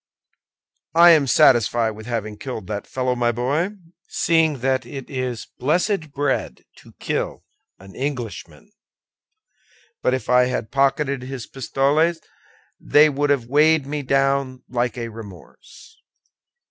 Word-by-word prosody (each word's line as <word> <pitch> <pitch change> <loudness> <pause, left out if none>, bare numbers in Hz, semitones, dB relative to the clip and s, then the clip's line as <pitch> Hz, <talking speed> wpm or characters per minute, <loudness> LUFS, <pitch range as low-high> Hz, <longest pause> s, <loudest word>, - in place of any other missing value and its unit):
"I 170 +1 +8
am 150 -4 +4
satisfied 115 -1 +4
with 110 +1 -11
having 110 -3 -3
killed 110 -1 -7
that 105 +1 -5
fellow, 130 -1 -1
my 120 -1 +1
boy, 140 - -1 0.3
seeing 160 -5 +1
that 130 0 +1
it 135 -2 -9
is 130 -3 -3
blessed 165 - 0
bread 140 -1 -2
to - - -17
kill - - -4 0.3
an 95 0 -15
Englishman; 130 - -6 1.3
but 125 - +2
if 130 - -6
I 125 0 +4
had 125 -3 -3
pocketed 140 0 +1
his 130 -2 -7
pistoles, 145 +6 0 0.6
they 150 +1 +5
would 145 0 -1
have 140 -5 +1
weighed 150 +3 +3
me 145 +1 -4
down 135 -1 0
like 125 0 -2
a 115 -1 -4
remorse." 110 - -14
130 Hz, 130 wpm, -21 LUFS, 120-145 Hz, 1.3 s, I